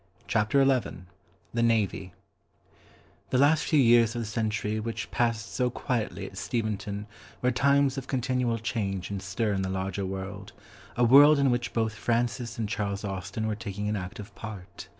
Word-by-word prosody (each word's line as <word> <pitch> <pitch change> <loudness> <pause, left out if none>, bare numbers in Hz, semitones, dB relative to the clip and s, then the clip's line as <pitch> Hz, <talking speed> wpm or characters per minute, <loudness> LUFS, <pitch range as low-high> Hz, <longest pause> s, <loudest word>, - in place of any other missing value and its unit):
CHAPTER 115 +5 +3
XI 130 -8 0 0.5
THE 115 - 0
NAVY 105 -5 +1 1.2
The 130 - +1
last 145 +3 +4
few 155 - +3
years 115 -3 +5
of 120 - -2
the - - -6
century 110 -1 -1
which 115 +1 -4
passed 115 -3 -1
so 125 -1 +1
quietly 120 -2 -3
at - - -8
Steventon 105 -3 -3 0.4
were 125 - +3
times 140 +1 +3
of 135 - -11
continual 125 -2 0
change 100 -5 -3
and 100 -1 -3
stir 100 +3 -1
in 95 - -1
the 95 - -2
larger 95 +1 -2
world, 95 +1 -6 0.4
a 120 - +3
world 145 +5 +8
in 140 -2 +3
which 120 -1 -1
both 110 -2 0
Francis 120 +2 -1
and 110 -2 -1
Charles 100 -1 -2
Austen 100 +3 -4
were 110 - 0
taking 105 -1 -5
an 105 - 0
active 95 +1 -7
part. 105 -5 -9
110 Hz, 170 wpm, -28 LUFS, 100-120 Hz, 1.2 s, world